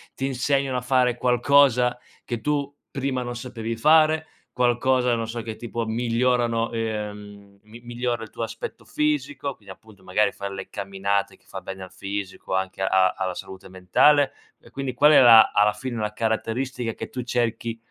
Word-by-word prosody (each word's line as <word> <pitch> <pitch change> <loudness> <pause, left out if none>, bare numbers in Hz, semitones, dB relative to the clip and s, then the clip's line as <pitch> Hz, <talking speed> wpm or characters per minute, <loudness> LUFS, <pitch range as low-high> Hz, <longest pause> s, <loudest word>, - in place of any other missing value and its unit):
ti 135 - -3
insegnano 135 0 0
a - - -2
fare 125 -1 +2
qualcosa 125 0 +3 0.2
che 120 -2 -4
tu 145 +1 -1 0.2
prima 135 -1 -2
non 120 0 -5
sapevi 115 -2 -5
fare? 155 +5 +4 0.3
Qualcosa, 125 0 +2
non 115 -1 -3
so, 115 +1 -5
che 110 -1 -7
tipo 115 -1 -4
migliorano, 115 0 0
ehm, 105 -3 -6
mi 110 +3 -14
migliora 120 -1 -3
il 110 - -9
tuo - - -5
aspetto 115 0 -7
fisico? 145 -2 -2
Quindi 100 -3 -12
appunto 105 -1 -20
magari 95 +3 +1
fare 100 0 -6
le 95 - -7
camminate 100 0 -2
che - - -30
fa - - -6
bene 95 0 -8
al 95 - -11
fisico, 100 -1 -5
anche 95 0 -3
a 95 -1 +3
alla 95 -1 -2
salute 95 +1 -9
mentale. 115 +10 +3 0.3
E - - -18
quindi 135 -2 -4
qual 145 +5 +5
è 150 - +8
la 115 -3 +8
alla 105 0 +4
fine 120 +3 -5
la 105 0 -2
caratteristica 115 +2 -2
che - - -7
tu 125 - -5
cerchi 115 -1 -2
115 Hz, 175 wpm, -24 LUFS, 105-130 Hz, 0.3 s, è